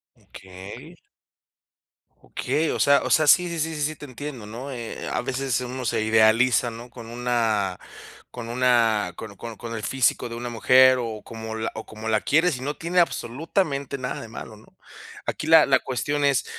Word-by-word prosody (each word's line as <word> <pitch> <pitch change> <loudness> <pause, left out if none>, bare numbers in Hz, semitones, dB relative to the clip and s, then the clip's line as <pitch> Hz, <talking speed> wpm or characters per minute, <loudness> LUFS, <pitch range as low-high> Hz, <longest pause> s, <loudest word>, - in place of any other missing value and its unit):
Okey. 95 +1 -12 1.2
Okey 160 +1 -2
o - - -3
sea 140 0 +5
o - - -3
sea, 155 - +4
sí, 180 +5 +6
sí, 170 -1 -4
sí, 160 +1 -1
sí, 150 - -5
sí, 155 +2 -1
te 145 - -10
entiendo, 130 -3 -7
¿no? 120 +6 -7
Eh, 120 -3 -6
a - - -1
veces 130 -1 -1
uno 125 +1 -5
se 110 - 0
idealiza, 110 +3 +4
¿no?, 115 +2 -10
con 120 -1 -11
una 115 -5 -1 0.5
con 120 -2 -7
una, 120 -4 +2
con 110 -2 -8
con 115 +2 -8
con 115 +1 -6
el 110 - -6
físico 130 +2 +1
de 115 - -6
una 120 +1 -5
mujer 130 +3 +5
o 110 -3 -5
como 110 -1 -7 0.2
o 110 - -6
como 110 0 -9
la 110 -1 +2
quieres 160 -1 +2
y - - -10
no 145 +2 -4
tiene 170 +3 0
absolutamente 140 - -1
nada 125 -1 -4
de - - -8
malo, 110 0 -9
¿no? 110 - -21 0.5
Aquí 155 - -4
la 160 -1 +8
la 135 -1 +4
cuestión 145 +4 -2
es, 140 -2 +2
125 Hz, 190 wpm, -24 LUFS, 110-140 Hz, 1.2 s, la